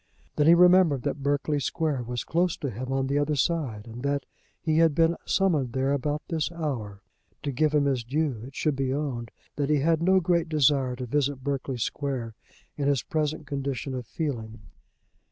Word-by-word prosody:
Then 150 - +3
he 170 - +8
remembered 180 -6 +5
that 140 0 -2
Berkeley 145 +1 0
Square 140 -3 -1
was 120 -1 -3
close 175 +1 0
to 140 - -3
him 130 +5 -5
on 135 0 +1
the 140 +2 +1
other 145 +1 +1
side, 140 -8 -1
and 115 +1 -9
that 140 0 -1 0.3
he 155 0 +1
had 165 -3 +4
been 165 +1 +3
summoned 155 -11 +1
there 135 +1 +1
about 145 +2 -1
this 160 0 -1
hour. 120 - -4 0.4
To 140 - -1
give 150 +4 +2
him 145 -1 +3
his 130 -4 0
due, 135 -1 -1
it 135 - -14
should 150 -3 0
be 135 -1 -1
owned 130 -5 -3 0.3
that 145 -1 0
he 150 - +4
had 160 +2 +2
no 190 +2 +4
great 170 -1 +1
desire 140 -4 +2
to 125 0 -5
visit 140 +1 -1
Berkeley 135 -2 -2
Square 125 -1 -3 0.4
in 140 -1 -1
his 140 -4 +2
present 155 0 -2
condition 140 -2 -3
of 125 -3 -5
feeling. 115 -9 -4
140 Hz, 190 wpm, -27 LUFS, 130-155 Hz, 0.4 s, he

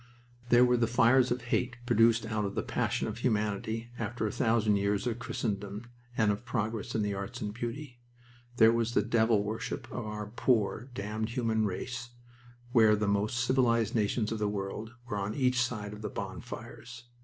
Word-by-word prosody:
There 120 0 +7
were 125 0 +3
the 115 -1 +2
fires 120 +2 +4
of 120 0 -1
hate, 120 0 -1
produced 115 -1 +4
out 110 -1 -1
of 100 0 -3
the - - -1
passion - - -1
of 110 +1 -5
humanity 110 0 -1
after 120 -2 -2
a 105 - -1
thousand 110 -3 +2
years 100 +2 0
of 120 -1 -2
Christendom 105 -3 -3 0.3
and 110 -2 +4
of 105 +3 -4
progress 115 -1 -3
in 110 - +1
the 105 -1 -1
arts 100 +5 -5
of 105 -4 -4
beauty. 120 +3 -6 0.6
There 110 -1 +7
was 115 0 0
the - - +4
devil 110 -2 +3
worship 115 +3 -4
of 120 -3 -4
our 105 0 -4
poor, 115 +2 0
damned 110 +2 -3
human 110 -3 +1
race, 120 +5 -5 0.6
where 110 -4 +6
the 105 0 -1
most 105 +4 +1
civilized 120 -3 +2
nations 110 0 0
of 110 - -2
the 105 -1 +1
world 105 +3 -5
were 105 - -3
on 100 +2 -3
each 125 -2 +2
side 105 -4 -2
of 105 - -9
the 105 - -3
bonfires. 100 +5 -7
110 Hz, 185 wpm, -30 LUFS, 105-120 Hz, 0.6 s, There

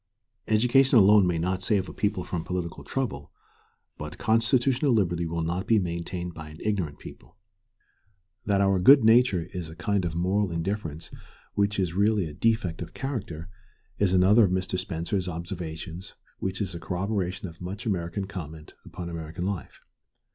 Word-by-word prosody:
Education 125 +4 +4
alone 105 -2 +7
may 85 -2 +1
not 90 +3 -1
save 95 -1 +1
a - - -8
people 100 -3 -1
from 85 -2 -4
political 90 -1 -4
trouble, 110 - -3 0.7
but 75 +3 -7
constitutional 120 +4 +2
liberty 85 -6 +1
will 85 0 -2
not 90 +4 -2
be 115 - +5
maintained 85 -1 -3
by 80 -1 -9
an 75 - -11
ignorant 95 -9 -1
people. - - -13 1.1
That 100 -1 +3
our 95 -1 +3
good 135 +8 +8
nature 110 -5 +5
is 90 -4 -5
a 80 - -10
kind 100 +2 0
of 85 -2 -2
moral 95 +4 +1
indifference 85 -2 -4 0.4
which 100 0 +1
is 90 -4 0
really 100 0 +2
a 75 - -7
defect 95 -1 0
of - - -7
character 95 - -4 0.5
is 100 -3 +3
another 95 +5 +6
of - - 0
Mr. 95 0 -1
Spencer's 90 +2 -2
observations 85 0 -6 0.2
which 95 +2 -3
is 95 -4 -2
a 85 - -6
corroboration 95 +1 -2
of 85 0 -13
much 95 +3 -6
American 95 -2 -2
comment 80 -5 -8
upon 90 -1 -7
American 85 +1 -5
life. 100 -3 -5
95 Hz, 160 wpm, -27 LUFS, 85-105 Hz, 1.1 s, good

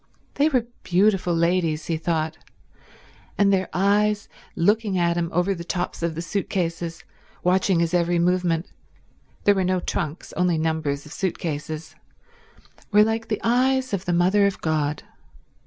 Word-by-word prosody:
They 290 +2 +3
were 255 -6 +1 0.2
beautiful 185 -1 +2
ladies, 165 -2 +1
he 165 - -1
thought, 160 0 -1 1.0
and 200 -1 +4
their 190 -1 +1
eyes, 205 +2 +2 0.3
looking 205 +2 +2
at 170 -1 +2
him 170 -1 -1
over 180 +4 +1
the 170 -2 -7
tops 175 0 -3
of 165 -1 -1
the 165 - -4
suit 200 +3 -3
cases 170 -2 -3 0.4
watching 185 0 +2
his 170 +1 0
every 175 0 +2
movement—there 180 +3 -1
were 190 -1 0
no 185 0 +1
trunks, 170 -2 -4
only 180 -2 +1
numbers 155 -3 -1
of 150 - -10
suit 190 -3 -2
cases—were 155 0 -5 1.1
like 225 +1 -1
the 215 - -2
eyes 260 +2 +2
of 195 -1 -2
the 175 - 0
Mother 190 +4 +4
of 200 - -3
God. 150 -2 -1
180 Hz, 150 wpm, -24 LUFS, 165-200 Hz, 1.1 s, and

